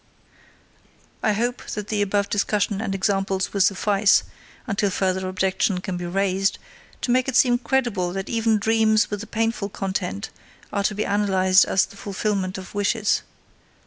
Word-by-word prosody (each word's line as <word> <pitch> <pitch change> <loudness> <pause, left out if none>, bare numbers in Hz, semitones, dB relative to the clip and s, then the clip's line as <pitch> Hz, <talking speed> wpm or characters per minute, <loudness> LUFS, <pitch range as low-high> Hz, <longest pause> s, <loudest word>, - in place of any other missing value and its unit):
I 215 - +2
hope 240 +4 -1
that 210 0 -5
the 210 -1 0
above 200 0 +1
discussion 205 0 0
and 195 -3 -2
examples 195 -1 0
will 200 - 0
suffice 200 +1 +3 0.4
until 200 -3 0
further 190 0 -1
objection 190 0 0
can 185 0 -4
be 175 0 -4
raised 195 +1 0 0.4
to 245 - 0
make 255 +1 +2
it 265 - -2
seem 245 -2 +4
credible 235 -8 0
that 195 0 -4
even 225 -1 +1
dreams 220 0 +2
with 205 -1 -3
a 220 - -8
painful 225 -2 -1
content 190 - -4 0.4
are 200 - +1
to 210 - 0
be 210 - -1
analyzed 190 -2 +3
as 190 - +2
the 200 - -16
fulfillments 195 -2 -2
of 190 0 -9
wishes. 205 +1 +1
200 Hz, 160 wpm, -23 LUFS, 190-215 Hz, 0.4 s, seem